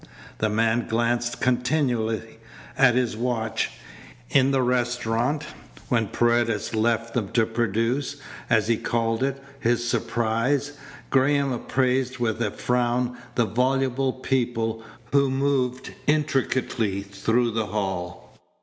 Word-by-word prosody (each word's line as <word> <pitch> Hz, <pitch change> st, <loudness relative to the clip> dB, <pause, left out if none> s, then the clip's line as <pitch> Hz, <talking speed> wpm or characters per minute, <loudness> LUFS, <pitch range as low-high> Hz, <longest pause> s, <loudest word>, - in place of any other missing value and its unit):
The 110 Hz, -, +1 dB
man 115 Hz, +2 st, +1 dB
glanced 120 Hz, +1 st, 0 dB
continually 120 Hz, -4 st, 0 dB, 0.4 s
at 130 Hz, -3 st, +5 dB
his 125 Hz, -3 st, +1 dB
watch. 115 Hz, -1 st, -1 dB, 0.6 s
In 130 Hz, 0 st, +4 dB
the 135 Hz, -2 st, +2 dB
restaurant, 125 Hz, +3 st, 0 dB, 0.4 s
when 115 Hz, -3 st, +2 dB
Paredes 120 Hz, -1 st, +1 dB
left 115 Hz, +1 st, +1 dB
them 110 Hz, -5 st, -1 dB
to 115 Hz, -2 st, +4 dB
produce, 115 Hz, +4 st, -1 dB, 0.3 s
as -, -, +3 dB
he 115 Hz, -1 st, +2 dB
called 115 Hz, 0 st, -1 dB
it, 135 Hz, 0 st, 0 dB, 0.2 s
his 120 Hz, -1 st, +1 dB
surprise, 120 Hz, +5 st, 0 dB, 0.4 s
Graham 140 Hz, +1 st, +3 dB
appraised 130 Hz, +1 st, 0 dB
with 120 Hz, -2 st, -1 dB
a 110 Hz, -, +1 dB
frown 125 Hz, +2 st, 0 dB, 0.2 s
the 120 Hz, -, +3 dB
voluble 130 Hz, +4 st, +1 dB
people 115 Hz, -4 st, -1 dB, 0.3 s
who 140 Hz, -1 st, +4 dB
moved 130 Hz, -2 st, 0 dB
intricately 130 Hz, -8 st, 0 dB
through 110 Hz, +4 st, 0 dB
the 110 Hz, -1 st, -1 dB
hall. 95 Hz, -3 st, -4 dB
120 Hz, 115 wpm, -25 LUFS, 115-130 Hz, 0.6 s, at